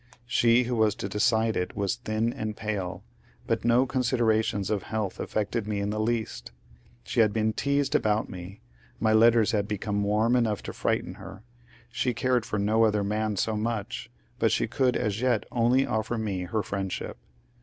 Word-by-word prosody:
She 120 0 +4
who 125 0 -2
was 110 -2 +2
to - - -4
decide 110 +2 +2
it 90 - -2
was 100 0 0
thin 115 0 -1
and 110 -5 -4
pale, 95 -4 -3 0.4
but - - -1
no 120 +2 +4
considerations 115 -5 +1
of 105 -2 0
health 110 -4 -3
affected 105 +1 -2
me 105 -1 -1
in 100 +1 -1
the 105 - -2
least 110 - -2 0.5
She - - -2
had 110 -2 +5
been 110 0 0
teased 140 +2 0
about 105 0 +2
me, 90 +2 -9 0.4
my 110 +1 +2
letters 115 0 +5
had 105 -2 0
become 105 -1 -2
warm 110 +4 +2
enough 110 -5 +1
to - - -6
frighten - - -1
her, 95 +3 -10 0.5
she 125 0 -1
cared 125 -3 +1
for 105 - -2
no 110 +3 +2
other 105 -2 +2
man 105 +1 -1
so 110 +3 0
much, 110 +1 -3 0.3
but 110 - +3
she - - +2
could 125 +2 +1
as 105 0 -1
yet 125 -4 +2
only 125 +3 +3
offer 110 +2 -1
me 100 -5 -2
her 105 +4 -1
friendship. 95 -1 -4
110 Hz, 180 wpm, -27 LUFS, 105-115 Hz, 0.5 s, had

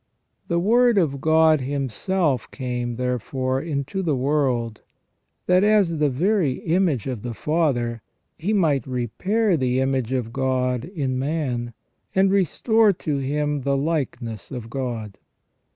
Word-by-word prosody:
The 170 - 0
Word 235 +5 +4
of 140 -7 +1
God 160 -1 +4
Himself 140 - -1
came, 125 -2 -3
therefore, 130 +2 -2
into 155 +4 -3
the 160 -6 0
world, 130 -5 0 0.6
that, 180 +1 +4
as 205 -7 +3
the 150 -1 +3
very 170 +1 +1
image 165 - 0
of 125 -5 -4
the 120 0 -5
Father, 125 -8 0 0.3
He 180 +7 -2
might 155 - +2
repair 185 - 0
the 130 -3 0
image 130 -2 0
of 120 -3 -2
God 125 -2 0
in 140 -8 -3
man, 130 -5 -2 0.4
and 190 0 +4
restore 205 - +3
to 150 -4 -3
him 145 +1 -1
the 140 +1 0
likeness 135 -8 -3
of 120 -3 -7
God. 120 -7 -4
140 Hz, 135 wpm, -23 LUFS, 125-170 Hz, 0.6 s, Word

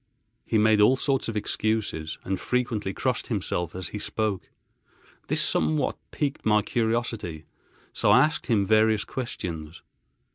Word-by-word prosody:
He 110 - +2
made 110 0 +4
all 125 +6 +5
sorts 135 0 0
of 115 -2 -2
excuses, 105 -7 -1
and 95 0 -2
frequently 120 -6 -1
crossed - - -1
himself 85 -1 -2
as 95 -1 -4
he 105 - -5
spoke. 105 -2 -2 0.8
This - - +2
somewhat 80 0 +1
piqued 140 -2 -2
my 105 -1 +3
curiosity, 115 -9 -2 0.5
so - - +1
I - - +7
asked 155 - -4
him 105 -5 +2
various 110 0 +3
questions. 85 -10 -6
105 Hz, 140 wpm, -26 LUFS, 95-115 Hz, 0.8 s, I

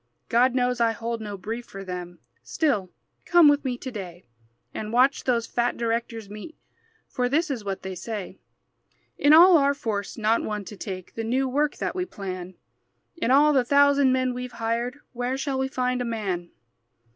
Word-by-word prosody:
God 245 +2 +3
knows 250 -1 +1
I 230 -1 +3
hold 230 +1 -4
no 205 -2 -6
brief 225 +6 -5
for 195 0 -8
them; 180 -2 -6 0.2
Still, 240 - 0 0.3
come 345 -3 +6
with 290 0 +4
me 255 -3 -2
to 260 +1 -7
day 185 -5 -8 0.5
And 215 0 -5
watch 255 +4 +3
those 235 -3 +1
fat 240 0 -1
directors 230 -2 -2
meet, 210 +11 -10 0.5
For 250 -1 -1
this 315 +4 +1
is 240 -6 -4
what 195 -1 -4
they 190 0 -5
say: 205 +2 -6 0.8
"In 290 - +5
all 340 +3 +9
our 280 0 +2
force 215 -6 -4
not 225 +1 +2
one 210 -2 -4
to 210 - -9
take 185 -2 -7
The 225 - -4
new 260 +4 0
work 290 +3 0
that - - -2
we 365 -1 -1
plan! 185 - -7 0.6
In 335 - -1
all 295 +3 +5
the 265 -3 +4
thousand 280 +1 +4
men 255 -1 +1
we've 250 0 -6
hired 235 +3 -2 0.2
Where 245 +2 -2
shall 270 -1 -2
we 265 - 0
find 250 -1 -1
a - - 0
man?" 200 -7 -3
240 Hz, 185 wpm, -25 LUFS, 210-265 Hz, 0.8 s, all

